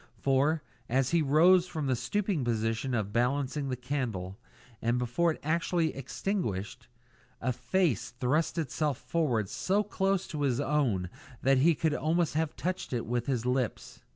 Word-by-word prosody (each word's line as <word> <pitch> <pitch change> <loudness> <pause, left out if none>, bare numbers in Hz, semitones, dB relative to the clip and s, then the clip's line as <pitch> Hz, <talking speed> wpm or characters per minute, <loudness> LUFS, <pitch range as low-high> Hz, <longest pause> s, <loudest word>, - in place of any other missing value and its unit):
For, 140 +4 +2 0.3
as 130 +2 +1
he 170 -1 +3
rose 170 +5 +5
from 160 -5 -3
the 130 -1 +2
stooping 185 - -1
position 115 +2 -1
of 105 -2 -2
balancing 135 +3 0
the 130 - -1
candle, 120 -7 -3 0.4
and 120 +2 +1
before 125 +8 +1
it 160 - -2
was - - -7
actually 170 -1 +1
extinguished, 130 - -3 0.5
a 125 +2 0
face 130 - 0
thrust 140 +7 0
itself 150 -2 -1
forward 125 -6 0
so 200 - 0
close 195 -2 0
to 150 - -4
his 135 -3 +1
own 135 -11 +1 0.4
that 135 0 +4
he 160 +4 +5
could 155 +1 +1
almost 165 +2 +1
have 160 0 -1
touched 185 -5 -3
it 120 - -1
with 120 +1 -2
his 125 -4 0
lips. 125 -2 -2
135 Hz, 160 wpm, -30 LUFS, 120-165 Hz, 0.5 s, rose